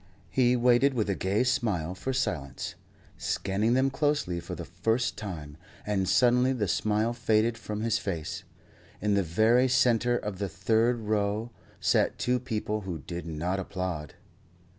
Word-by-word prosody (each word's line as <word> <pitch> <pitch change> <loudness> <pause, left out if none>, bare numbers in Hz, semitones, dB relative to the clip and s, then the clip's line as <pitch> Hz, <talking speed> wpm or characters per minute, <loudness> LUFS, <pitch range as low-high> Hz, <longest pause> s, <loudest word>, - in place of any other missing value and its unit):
He 125 -1 +3
waited 125 +3 +4
with 105 -4 +1
a - - 0
gay 100 +6 +1
smile 110 - 0
for 115 +8 -4
silence, 75 - -2 0.5
scanning 105 +5 0
them 135 +1 +2
closely 145 - 0
for - - -6
the - - -6
first 115 +3 0
time; 80 -8 -7 0.3
and 95 -3 0
suddenly 125 +1 +4
the 110 -6 -1
smile 110 +5 +1
faded 115 -1 +2
from 105 -2 -5
his 115 -1 +1
face. 85 -6 -4 0.6
In 105 0 +1
the 100 - +3
very 110 +9 +3
centre 120 -2 +3
of 105 -5 -5
the 100 -1 -2
third 115 +3 +1
row 105 +2 -1 0.3
sat - - +2
two 125 0 +1
people 110 -3 -3
who 95 -4 -4
did 85 -1 -6
not 85 +4 -2
applaud. 90 -6 -4
110 Hz, 155 wpm, -28 LUFS, 95-120 Hz, 0.6 s, waited